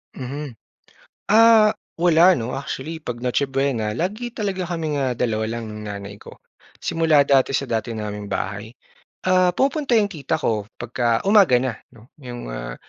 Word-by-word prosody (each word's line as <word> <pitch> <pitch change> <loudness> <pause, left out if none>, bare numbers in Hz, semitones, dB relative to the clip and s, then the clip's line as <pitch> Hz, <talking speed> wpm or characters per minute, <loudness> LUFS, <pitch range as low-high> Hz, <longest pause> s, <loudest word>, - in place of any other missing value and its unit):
Mhm. 140 +1 -6 0.8
Ah, 220 0 +7 0.2
wala, 175 +2 +5
'no, 120 -3 -3
actually, 140 +3 -5
'pag 125 -6 -7
Noche 125 +2 0
Buena 135 -6 -1
lagi 215 - -3
talaga 195 -4 -2
kaming, 155 -3 -2
ah, 130 -2 0
dalawa 110 -2 -1
lang 115 0 -5
ng 105 0 -8
nanay 100 0 -7
ko. - - -13 0.5
Simula 160 -3 +3
dati 135 -1 +2
sa 135 0 -1
dati 115 0 -2
naming 105 -1 -5
bahay. 100 +3 -4 0.5
Ah, 185 -1 +4
pumupunta 275 -2 +2
'yong 205 -2 +2
tita 145 -5 -2
ko, 105 -2 -2
'pagka 120 +1 -1
umaga 195 - +5
na, 125 0 -1 0.2
'no, 115 -2 -18 0.2
'yong, 120 -2 -8
ah, - - -6
130 Hz, 160 wpm, -22 LUFS, 115-175 Hz, 0.8 s, Ah